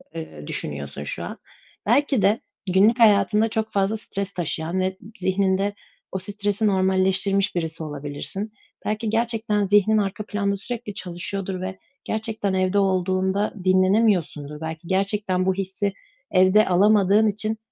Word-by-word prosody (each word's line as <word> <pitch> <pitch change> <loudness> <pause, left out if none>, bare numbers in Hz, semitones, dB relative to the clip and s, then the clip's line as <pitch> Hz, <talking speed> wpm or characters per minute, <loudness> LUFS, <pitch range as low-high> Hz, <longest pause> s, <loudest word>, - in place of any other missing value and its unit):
eee, 75 - -8
düşünüyorsun 70 -1 -1
şu - - -3
an. - - -6 0.5
Belki 270 +1 +2
de 200 +4 +3 0.3
günlük 215 +6 +4
hayatında 215 0 +4
çok 220 0 -2
fazla 200 +2 +1
stres 200 -1 -2
taşıyan 170 +1 0
ve 190 0 -1 0.2
zihninde 190 +1 +1 0.4
o 190 - -2
stresi 205 +2 -1
normalleştirmiş 190 0 +2
birisi 165 -1 -3
olabilirsin. 150 +8 -5 0.3
Belki 215 +1 -1
gerçekten 225 -2 0
zihnin 205 +2 +4
arka 205 0 -2
planda 200 -1 -1
sürekli 225 0 -6
çalışıyordur 185 +1 -2
ve 185 0 -5 0.2
gerçekten 220 -3 -2
evde 185 +2 +1
olduğunda 190 +1 0
dinlenemiyorsundur. 185 -6 +2
Belki 160 +1 -6
gerçekten 195 -1 0
bu 190 - +2
hissi 195 +1 -2 0.4
evde 185 +3 +5
alamadığın 205 +3 +4
için, 215 +1 0
195 Hz, 130 wpm, -23 LUFS, 185-210 Hz, 0.5 s, evde